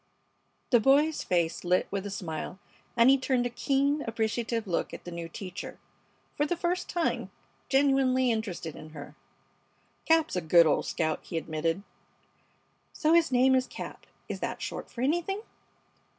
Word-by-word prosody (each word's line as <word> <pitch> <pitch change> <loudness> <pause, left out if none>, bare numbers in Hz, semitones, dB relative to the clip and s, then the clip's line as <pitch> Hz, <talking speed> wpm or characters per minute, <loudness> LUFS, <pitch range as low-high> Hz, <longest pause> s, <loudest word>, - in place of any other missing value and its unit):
The 240 - +6
boy's 290 +6 +3
face 170 -2 0
lit 180 +1 +2
with 200 0 -2
a - - -5
smile, 175 -3 -5 0.4
and 235 +1 +6
he 270 +1 +6
turned 255 -2 +1
a 245 - -2
keen, 280 +4 +1
appreciative 225 0 -1
look 180 -4 -2
at - - -11
the 175 - -8
new 170 -1 -6
teacher, 180 +1 -7 0.6
for 295 - +1
the 350 - -1
first 355 +1 -1
time 345 -2 -1 0.4
genuinely 270 -2 +3
interested 200 -8 -3
in 155 - -10
her. 145 -2 -9 0.9
"Cap's 320 -5 +3
a 180 - 0
good 170 +1 +6
old 155 - +1
scout," 160 -2 -1
he 165 - -5
admitted. 165 +3 -2 1.1
"So 315 +1 +2
his 335 -3 +4
name 255 +1 +5
is 255 -1 +2
Cap. - - -8 0.2
Is - - -5
that - - -3
short - - -5
for 235 - -7
anything?" 345 - 0
240 Hz, 160 wpm, -29 LUFS, 175-280 Hz, 1.1 s, The